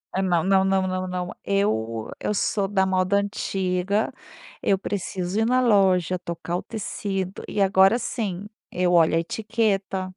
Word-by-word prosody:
É 190 - +1
não, 175 -3 +2
não, 190 0 +3
não, 190 -1 +1
não, 185 0 -2
não, 180 -1 -4
eu 115 - -1
eu - - -1
sou 200 0 0
da 195 -1 +1
moda 190 +1 +2
antiga, 195 +1 -1 0.5
eu 195 - +3
preciso 190 0 -3
ir 225 - +2
na 255 +2 +3
loja, 190 -6 +3
tocar 170 0 -5
o - - -6
tecido 195 -3 -4
e 205 - -2
agora, 195 +2 +5
assim, 205 -5 -4 0.2
eu 180 0 +1
olho 165 -1 +5
a - - +3
etiqueta. 200 0 -1
190 Hz, 160 wpm, -24 LUFS, 180-200 Hz, 0.5 s, agora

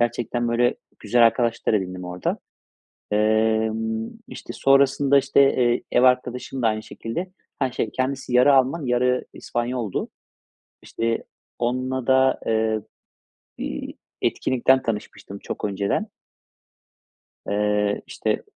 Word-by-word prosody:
Gerçekten, 120 0 0
böyle, 120 +2 +2 0.2
güzel 115 +3 +4
arkadaşlar 115 -1 +1
edindim 90 -2 -2
orada. 90 0 -3 0.7
Emm, 110 +1 +1 0.2
işte, - - -8
sonrasında, 135 +1 +4
işte, 135 - +2 0.2
eee, 120 -1 +2
ev 120 - +4
arkadaşım 125 0 +1
da 115 - +4
aynı 110 0 -2
şekilde, 170 +13 -5 0.3
ha 130 -3 0
şey, 110 - -2
kendisi 130 +1 -3
yarı 125 +3 +6
Alman 135 +4 +2
yarı 125 +1 +1
İspanyol'du. 120 -4 -3 0.7
İşte, 115 0 -2 0.3
onunla 130 +1 -1
da, 130 0 +4
eee, 110 -1 +1 0.8
bir 65 - -5 0.3
etkinlikten 130 +1 +2
tanışmıştım 105 -2 -5
çok - - -6
önceden 100 -1 -1 1.4
eee, 105 0 0
işte - - -2
120 Hz, 110 wpm, -23 LUFS, 110-130 Hz, 1.4 s, yarı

